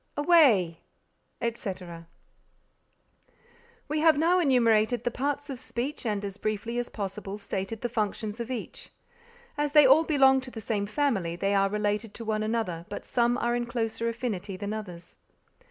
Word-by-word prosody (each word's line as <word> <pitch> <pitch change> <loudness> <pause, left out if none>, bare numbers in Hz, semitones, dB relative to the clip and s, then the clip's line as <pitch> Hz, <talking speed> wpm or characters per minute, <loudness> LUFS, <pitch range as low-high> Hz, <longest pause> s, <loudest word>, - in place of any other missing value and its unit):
away!_ 270 - +4 0.6
etc. 185 -7 -5 1.8
We 305 +1 -1
have 315 -1 +5
now 340 +4 +3
enumerated 235 -6 +3
the 245 - 0
parts 285 +3 -2
of 270 -4 -6
speech 255 +1 -4
and 205 -1 -1
as 200 0 -6
briefly 215 +3 -2
as 245 - -3
possible 200 0 -5
stated 200 +1 -4
the 240 - 0
functions 215 -1 -3
of 235 +1 -4
each. 250 -3 -6 0.7
As 295 -1 0
they 300 -2 +8
all 275 +5 +7
belong 270 -4 +4
to 260 - -9
the 235 - -8
same 210 -2 -2
family 210 -8 0
they 195 +3 0
are 195 0 +3
related 210 +1 -2
to 230 - -7
one 215 0 -1
another 215 -7 -2
but - - -6
some 240 0 +1
are 240 -1 0
in 240 0 -2
closer 230 -1 -2
affinity 210 -5 -4
than 205 +2 -4
others. 180 -5 -8
225 Hz, 160 wpm, -27 LUFS, 205-260 Hz, 1.8 s, they